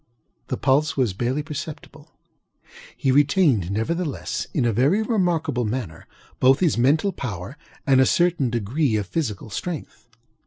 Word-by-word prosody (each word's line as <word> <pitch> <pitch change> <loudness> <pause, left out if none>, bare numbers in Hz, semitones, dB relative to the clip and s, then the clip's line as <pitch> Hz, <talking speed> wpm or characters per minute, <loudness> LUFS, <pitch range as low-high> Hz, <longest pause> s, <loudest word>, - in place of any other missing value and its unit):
The - - -2
pulse 145 +4 +1
was 125 -7 +1
barely 125 +8 -1
perceptible. 150 0 -8 0.9
He 135 - +1
retained, 140 - +3
nevertheless, 145 - -2
in 130 - 0
a 115 - +2
very 140 - +2
remarkable 170 - 0
manner, 105 -8 -4 0.3
both 130 +2 +5
his 175 -4 +2
mental 150 +11 +2
power 110 - -6 0.3
and 135 -2 +5
a 130 - +4
certain 170 -7 +2
degree 120 +3 0
of 105 -2 -1
physical 110 - -4
strength. 165 - -6
135 Hz, 140 wpm, -23 LUFS, 115-160 Hz, 0.9 s, both